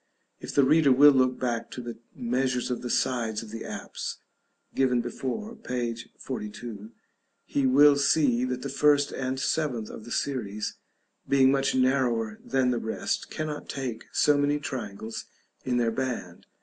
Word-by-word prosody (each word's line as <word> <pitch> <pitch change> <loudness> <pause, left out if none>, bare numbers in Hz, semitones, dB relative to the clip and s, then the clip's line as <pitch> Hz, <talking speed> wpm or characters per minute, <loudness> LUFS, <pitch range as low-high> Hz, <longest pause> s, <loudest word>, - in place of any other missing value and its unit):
If - - -7
the 140 - +6
reader 145 +1 +5
will 145 +3 +8
look 130 -2 +2
back 120 -2 -2
to - - -7
the 120 -2 -7 0.2
measures 125 +1 -1
of 125 - -2
the 125 - -5
sides 115 -4 0
of 110 - -11
the 115 0 -6
apse, - - -6 0.6
given 130 -2 +2
before, 130 - -4
p. 125 - -3 0.2
42, 105 -3 -6 0.6
he 140 -2 +1
will 145 +2 +7
see 140 -4 +3
that 125 0 -3
the 140 - -3
first 145 +1 +3
and 130 0 -3
seventh 130 -7 -1
of - - -9
the 120 - -10
series, 110 -7 -2 0.6
being 135 -1 +5
much 135 -1 +1
narrower 125 -4 +1
than 130 -1 +1
the 120 - 0
rest, 110 - -2
cannot 155 -1 -5
take 125 -5 -4
so 150 - +4
many 145 +1 +2
triangles 110 -5 -5 0.4
in 125 -1 +1
their 115 -2 +2
band. 130 +1 -4
130 Hz, 160 wpm, -27 LUFS, 115-140 Hz, 0.6 s, will